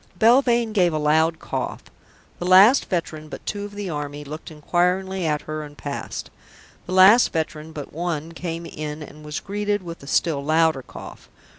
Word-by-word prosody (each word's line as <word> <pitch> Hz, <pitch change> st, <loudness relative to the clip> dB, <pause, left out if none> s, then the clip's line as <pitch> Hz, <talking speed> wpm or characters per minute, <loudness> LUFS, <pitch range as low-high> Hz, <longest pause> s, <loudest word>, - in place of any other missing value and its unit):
Belvane 235 Hz, 0 st, +4 dB
gave 180 Hz, -5 st, +3 dB
a -, -, 0 dB
loud 160 Hz, +2 st, +2 dB
cough. -, -, -4 dB, 0.6 s
The 175 Hz, -, -4 dB
last 195 Hz, +8 st, +7 dB
veteran 155 Hz, -3 st, -3 dB
but -, -, -9 dB
two 205 Hz, -1 st, -3 dB
of 205 Hz, 0 st, -10 dB
the 205 Hz, -1 st, -4 dB
Army 145 Hz, -1 st, -5 dB
looked 150 Hz, +2 st, -8 dB
inquiringly 180 Hz, +3 st, 0 dB
at 150 Hz, -1 st, -1 dB
her 155 Hz, 0 st, -5 dB
and 145 Hz, -1 st, -10 dB
passed. 140 Hz, -1 st, -6 dB, 0.6 s
The 180 Hz, -, -4 dB
last 195 Hz, +6 st, +7 dB
veteran 160 Hz, -1 st, -3 dB
but 150 Hz, -3 st, -8 dB
one 165 Hz, -1 st, -3 dB
came 165 Hz, 0 st, -5 dB
in 150 Hz, -1 st, -6 dB
and 150 Hz, +1 st, -12 dB
was 150 Hz, -1 st, -4 dB
greeted 205 Hz, 0 st, -2 dB
with 170 Hz, -1 st, -8 dB
a 140 Hz, -, -12 dB
still 150 Hz, -1 st, +1 dB
louder 160 Hz, -1 st, +2 dB
cough. -, -, -11 dB
165 Hz, 175 wpm, -23 LUFS, 150-190 Hz, 0.6 s, last